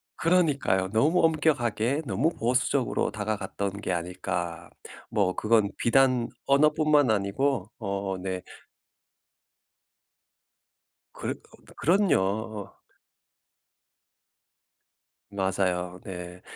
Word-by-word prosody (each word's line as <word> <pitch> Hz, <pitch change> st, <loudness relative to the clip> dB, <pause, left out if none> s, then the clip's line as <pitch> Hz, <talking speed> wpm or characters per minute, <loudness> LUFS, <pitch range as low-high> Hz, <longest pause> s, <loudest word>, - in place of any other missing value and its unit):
그러니까요. 145 Hz, -, +2 dB
'너무 155 Hz, +11 st, +3 dB
엄격하게 140 Hz, -5 st, +1 dB
너무 105 Hz, -, +1 dB
보수적으로 125 Hz, +2 st, 0 dB
다가갔던 100 Hz, -1 st, -3 dB
게 90 Hz, -, -2 dB
아닐까?' 85 Hz, -1 st, -4 dB, 0.4 s
뭐 95 Hz, -3 st, +1 dB
그건 110 Hz, -2 st, +2 dB
비단 125 Hz, -1 st, +3 dB, 0.2 s
언어뿐만 150 Hz, -2 st, +4 dB
아니고 105 Hz, +3 st, 0 dB
어 100 Hz, -4 st, -3 dB
네. 95 Hz, 0 st, -4 dB, 2.7 s
그럼 -, -, -3 dB, 0.4 s
그럼요. 110 Hz, -, +1 dB, 2.6 s
맞아요. 90 Hz, -2 st, -1 dB
네. 90 Hz, -1 st, -8 dB
110 Hz, 180 characters per minute, -27 LUFS, 95-140 Hz, 2.7 s, 언어뿐만